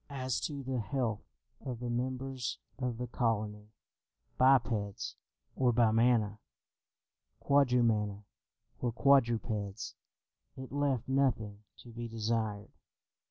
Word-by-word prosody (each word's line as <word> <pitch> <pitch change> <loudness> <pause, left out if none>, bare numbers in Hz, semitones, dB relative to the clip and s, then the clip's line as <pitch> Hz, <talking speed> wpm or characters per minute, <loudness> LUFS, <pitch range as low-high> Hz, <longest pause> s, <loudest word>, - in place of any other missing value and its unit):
As 130 -3 -2
to 140 -3 -6
the 130 -1 -2
health 115 -2 -1 0.4
of 125 -3 -4
the 120 -1 -3
members 130 +1 -2 0.2
of 125 -3 -2
the 125 - -3
colony, 110 -3 -1 0.7
bipeds 115 -6 +2 0.4
or 125 -2 +3
bimana, 115 -2 +3 1.0
quadrumana 115 -7 +2 0.6
or 120 - 0
quadrupeds, 115 -5 +2 0.6
it 130 0 -8
left 140 -4 0
nothing 110 -6 0 0.2
to 120 - -13
be 115 +1 -5
desired. 110 -2 -2
120 Hz, 100 wpm, -32 LUFS, 110-130 Hz, 1.0 s, or